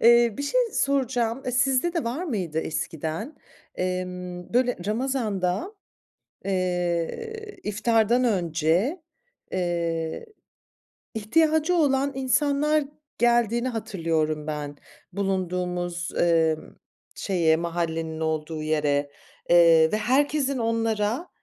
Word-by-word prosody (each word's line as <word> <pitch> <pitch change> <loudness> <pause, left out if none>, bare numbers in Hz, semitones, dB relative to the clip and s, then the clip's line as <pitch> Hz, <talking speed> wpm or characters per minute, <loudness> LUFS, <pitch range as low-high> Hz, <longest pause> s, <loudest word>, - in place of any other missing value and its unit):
Eee, 235 -1 +6
bir - - -2
şey - - +2
soracağım, 260 -3 0
eee, 250 - -2
sizde 270 +5 +2
de 335 - -1
var 255 +10 -2
mıydı 185 - -2
eskiden? 160 - -4 0.4
Emm, 180 0 -4
böyle 250 0 +3
ramazanda, 215 - -1 0.7
eee, 185 - -2
iftardan 225 +3 +2
önce, 180 - +1 0.5
eee, 170 - -2 0.9
ihtiyacı 315 - +2
olan 280 -4 +2
insanlar 290 +3 +2 0.3
geldiğini 240 0 +2
hatırlıyorum 165 -9 -2
ben, 145 -1 -4 0.4
bulunduğumuz, 180 -2 -2
emm, 165 -2 +2 0.4
şeye, 170 -5 +2
mahallenin 165 -1 -2
olduğu 155 0 -2
yere, 145 -2 0 0.4
eee, 165 -2 +6
ve 215 - +1
herkesin 275 +4 +1
onlara, 225 +5 0
200 Hz, 90 wpm, -25 LUFS, 170-255 Hz, 0.9 s, Eee